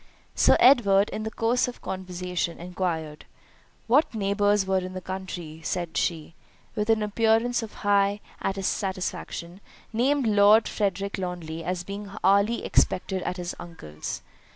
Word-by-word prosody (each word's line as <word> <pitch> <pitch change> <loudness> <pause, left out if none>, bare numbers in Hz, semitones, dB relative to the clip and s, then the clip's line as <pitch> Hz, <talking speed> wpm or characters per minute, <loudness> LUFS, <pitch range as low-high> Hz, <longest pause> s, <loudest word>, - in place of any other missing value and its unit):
Sir - - +5
Edward, 210 -6 +5
in - - -4
the 220 - -3
course 230 +3 +1
of 250 - -7
conversation, 180 -2 -3
enquired 170 -4 -4 0.6
"What 260 +1 +3
neighbours 205 -1 +2
were 190 0 +2
in 185 0 -6
the 185 - -4
country;" 180 -4 -6
and 175 -2 -5
she, 165 -2 -1 0.4
with 210 +1 -1
an 220 -1 +3
appearance 225 +3 +2
of 225 -2 -7
high 200 0 +3 0.2
satisfaction, 190 -2 -3 0.3
named 265 +4 +2
Lord 210 +1 +5
Frederick 200 -1 -2
Lawnly 170 -3 -5
as 180 +1 -2
being 200 +2 -7
hourly 200 +5 +3
expected 190 0 +1
at 180 - -3
his 175 -1 -4
uncle's. 75 - -7
195 Hz, 135 wpm, -26 LUFS, 180-210 Hz, 0.6 s, Sir